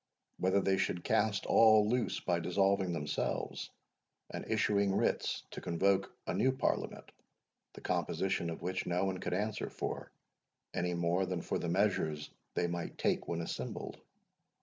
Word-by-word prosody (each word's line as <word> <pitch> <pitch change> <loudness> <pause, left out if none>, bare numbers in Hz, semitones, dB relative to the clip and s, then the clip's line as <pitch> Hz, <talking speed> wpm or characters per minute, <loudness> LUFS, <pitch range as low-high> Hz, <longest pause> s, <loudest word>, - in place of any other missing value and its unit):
Whether 95 +2 +3
they 95 0 +2
should 90 - -1
cast 110 -3 +1
all 110 -2 +6
loose 120 +2 0
by 85 -2 +1
dissolving 95 +1 +2
themselves, 75 -3 -2 0.6
and - - -4
issuing 100 -3 +2
writs - - 0
to - - -7
convoke 95 +3 +2
a - - -1
new 110 +8 +3
Parliament, 130 - -2 0.6
the - - -11
composition 95 -3 0
of 80 - -6
which 95 +1 -2
no 90 +2 +1
one 95 -1 -1
could 90 - -2
answer 105 +2 -2
for, - - -4 0.6
any 90 0 0
more 85 +2 +1
than 90 -3 -2
for - - -1
the 85 - -2
measures 85 -6 +1 0.2
they 90 - +2
might 85 0 -3
take - - 0
when 85 0 -1
assembled? 80 - -5
95 Hz, 150 wpm, -33 LUFS, 85-100 Hz, 0.6 s, all